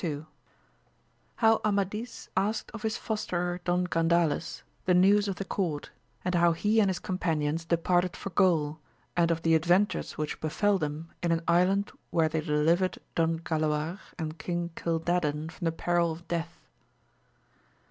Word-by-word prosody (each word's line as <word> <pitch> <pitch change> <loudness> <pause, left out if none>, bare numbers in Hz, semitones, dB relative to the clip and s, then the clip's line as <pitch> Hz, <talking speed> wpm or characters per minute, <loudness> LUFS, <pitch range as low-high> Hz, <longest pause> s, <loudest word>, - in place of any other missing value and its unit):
— - - -35
^How 225 0 +5
Amadis 210 +3 -2
asked 205 +4 0
of 225 - -8
his 220 -1 -1
fosterer 180 -5 -2
Don 180 0 +1
Gandales 165 -2 +1 0.2
the 180 - +4
news 200 +3 +5
of 195 - -2
the 195 - -5
court, 170 -7 -2 0.3
and 180 - 0
how 170 -1 +4
he 210 +6 +2
and 200 -3 +4
his 185 - -1
companions 165 -4 -1
de 170 0 +2
parted 175 +1 +1
for 195 - -6
Gaul, 160 -4 +2 0.4
and 170 -1 +3
of 165 -1 0
the 165 - +3
adventures 175 +5 +2
which 150 -1 -3
befell 200 +6 +1
them 150 +1 -4
in 170 -1 +1
an 165 0 +1
island 180 +4 +3 0.2
where 160 -2 +2
they 160 0 -1
delivered 160 +4 +2 0.2
Don 165 0 +1
Galaorand 155 +1 -2
King 175 -1 -2
CUdadan 165 -2 -1
from 175 - -7
the 165 - +2
peril 170 0 +1
of 165 +2 -9
death. 170 -1 -4
170 Hz, 155 wpm, -29 LUFS, 160-185 Hz, 0.4 s, ^How